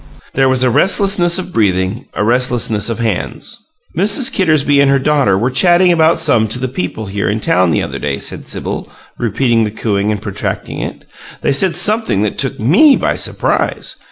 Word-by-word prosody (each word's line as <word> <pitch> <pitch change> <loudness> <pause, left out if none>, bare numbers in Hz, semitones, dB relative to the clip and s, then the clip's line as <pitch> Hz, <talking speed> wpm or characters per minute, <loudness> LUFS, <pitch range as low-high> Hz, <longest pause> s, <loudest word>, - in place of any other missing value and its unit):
There 135 0 +2
was 130 -1 +2
a 125 - +2
restlessness 190 - +2
of 185 -1 -5
breathing, 95 0 0
a - - -1
restlessness 120 -3 0
of 115 - -3
hands. 115 - -4 0.4
"Mrs. 210 - +2
Kittersby 155 -6 +2
and 140 -1 +4
her 140 - +3
daughter 135 -8 +1
were 120 +6 -1
chatting 175 +6 +4
about 165 0 +3
some 140 -9 +2
of 110 +3 -1
the 130 - -2
people 110 -3 -5
here 100 0 -3
in 105 +2 -1
town 90 -4 +1
the 80 - 0
other - - -6
day," 70 -2 -2
said - - -6
Sibyl, - - -5 0.3
repeating 115 +1 +1
the 105 - -1
cooing 105 -1 -2
and 105 - -2
protracting 100 -1 -4
it. - - -7 0.4
"They - - 0
said 170 +6 +3
something 215 - +2
that 105 - -3
took 135 - -2
ME 210 - +5
by - - -1
surprise! - - -2
125 Hz, 185 wpm, -14 LUFS, 105-165 Hz, 0.4 s, ME